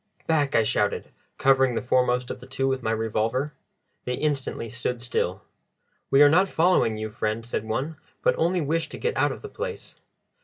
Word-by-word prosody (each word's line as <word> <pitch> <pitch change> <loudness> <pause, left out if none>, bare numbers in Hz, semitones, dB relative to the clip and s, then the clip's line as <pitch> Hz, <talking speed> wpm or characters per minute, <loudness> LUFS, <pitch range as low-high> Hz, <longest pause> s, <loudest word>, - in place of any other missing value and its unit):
"Back!" 150 -4 +1
I 115 - +5
shouted, 105 -2 0 0.3
covering 135 -2 +4
the - - 0
foremost 125 0 +1
of - - -6
the 125 - -12
two 135 0 -1
with 135 -1 0
my 110 - -2
revolver. 115 +5 -1 0.5
They 125 - -1
instantly 135 -5 -2
stood 120 +2 -3
still. 120 +1 -2 0.7
"We 135 +2 +7
are - - +9
not 185 +5 +4
following 160 -11 +3
you, 110 0 -4
friend," 110 +2 -2
said 115 -2 -3
one, 135 +8 -2 0.3
"but - - +4
only 175 +2 +1
wish 160 +3 -1
to - - -7
get 470 0 -1
out - - +2
of - - -7
the 430 - -7
place." 470 +2 -6
130 Hz, 190 wpm, -25 LUFS, 115-150 Hz, 0.7 s, are